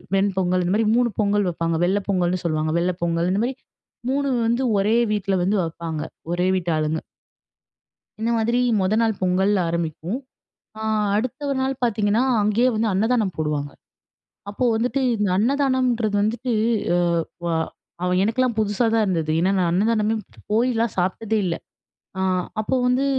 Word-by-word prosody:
வெண் 195 +1 +2
பொங்கல் 180 -1 +1
இந்த 175 +2 0
மாதிரி 220 0 +2
3 245 0 +3
பொங்கல் 205 0 +2
வைப்பாங்க. 165 -1 -1
வெள்ள 195 +3 +2
பொங்கல்னு 180 -2 +1
சொல்லுவாங்க. 155 -1 0
வெள்ள 180 +1 0
பொங்கல். 170 +1 0
இந்த 200 - +1
மாரி 255 +2 -1 0.6
3 280 +1 0 0.2
வந்து 235 +3 +1 0.2
ஒரே 210 +4 +2 0.2
வீட்ல 200 -2 0
வந்து 200 +4 +1
வைப்பாங்க, 165 -1 -4 0.3
ஒரே 180 +1 +1
வீட்டாளுங்க. 160 -3 -1 1.2
இந்த 225 +2 -1
மாதிரி, 235 +2 +1 0.2
மொத 190 +2 +1
நாள் 225 -3 +1
பொங்கல் 185 +2 +2 0.2
ஆரம்பிக்கும். 170 - -3 0.6
அ - - -4 0.3
அடுத்த 255 +5 -2
ஒரு 275 - -1
நாள் 265 0 -2
பார்த்தீங்கன்னா, 215 0 +1 0.2
அங்கேயே 215 +5 +3
வந்து 220 +1 +1
அன்னதானம் 215 0 +1
போடுவாங்க. 150 -2 -2 0.8
அப்போ 210 +5 -1
வந்துட்டு 245 +4 0 0.2
இந்த 210 -2 0
அன்னதானம்ன்றது 250 -2 +1
வந்துட்டு 235 +4 -1 0.4
எ - - +3 0.5
வ - - 0 0.6
அவ 180 - +1
எனக்கெல்லாம் 230 +2 0
புதுசா 215 +2 +1
தான் 225 -1 +3
இருந்தது. 165 -5 -1
ஏன்னா 185 +3 +2
நான் 175 -2 +2
அன்னதானமே 215 +3 +2 0.4
போய்லாம் 230 -1 +1
சாப்பிட்டதே 200 +5 0
இல்ல. 170 -2 0 0.6
அ - - -1 0.4
அப்போ 215 +4 0
வந்து 250 +2 +2
205 Hz, 150 wpm, -22 LUFS, 180-230 Hz, 1.2 s, 3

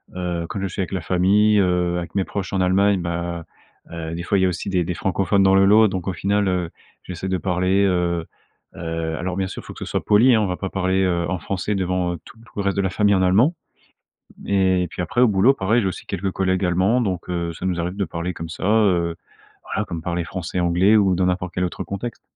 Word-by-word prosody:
Heu, 90 -2 -3
quand 100 - -5
je 95 - -1
suis 95 - -4
avec 95 - -4
la 95 - -2
famille, 100 +6 +3
heu, 90 -2 +1
avec 85 0 -6
mes 100 - +2
proches 95 -1 -5
en 95 - +1
Allemagne, 95 +1 +3
bah, 85 0 -3 0.5
heu, 80 -1 -5
des 85 - -5
fois, 100 - +1
il - - +2
y - - +4
a - - +3
aussi 90 +2 -4
des 90 -3 +1
des 90 - -2
francophones 95 +2 +1
dans 95 0 +5
le 95 0 +5
lot. 105 +2 +6
Donc, 95 -1 -4
au 95 - -1
final, 100 +3 0
heu, 90 -2 -1 0.3
j'essaie 90 +1 -6
de 95 0 0
parler, 90 +1 +1
heu 85 -3 0 0.5
heu, 80 -1 -3
alors, 90 +2 -3
bien 95 0 -1
sûr, - - -8
faut - - -9
que - - -13
ce - - -5
soit - - -2
poli, 115 +4 +5
hein. 110 - +3
On 105 - 0
va 90 - -2
pas 95 - -4
parler, 95 0 0
heu, 85 -2 0
en 95 -2 -2
français 100 +4 -3
devant, 90 -2 -1
heu, - - -5
tout - - -15
tout 115 - -19
le 105 - -1
reste 100 -1 -1
de - - +3
la 95 - 0
famille 100 +1 +2
en 95 - +2
allemand. 105 - +3 0.8
Mais, 95 -2 +1
puis 90 - -5
après, 100 +7 0
au 125 - +6
boulot, 105 +6 +4
pareil, 110 +1 +1
j'ai 100 - 0
aussi 95 - -5
quelques 95 0 -3
collègues 95 0 0
Allemands. 95 +7 +2
Donc 95 -7 -3
heu, 85 -1 -2
ça 85 - -7
nous 90 -2 -1
arrive 90 +2 -3
de 100 - -1
parler 85 +1 -4
comme 85 -1 -7
ça, 85 - -7
heu, 95 -6 +2 0.5
voilà, 105 - -3
comme 85 -4 -5
parler 85 0 -2
français, 90 +1 -4
anglais 90 +5 +4
ou 95 -3 +3
dans 90 +1 +1
n'importe 90 -1 -2
quel 90 - -1
autre 85 -2 -3
contexte. 105 +4 -6
95 Hz, 255 wpm, -22 LUFS, 85-100 Hz, 0.8 s, lot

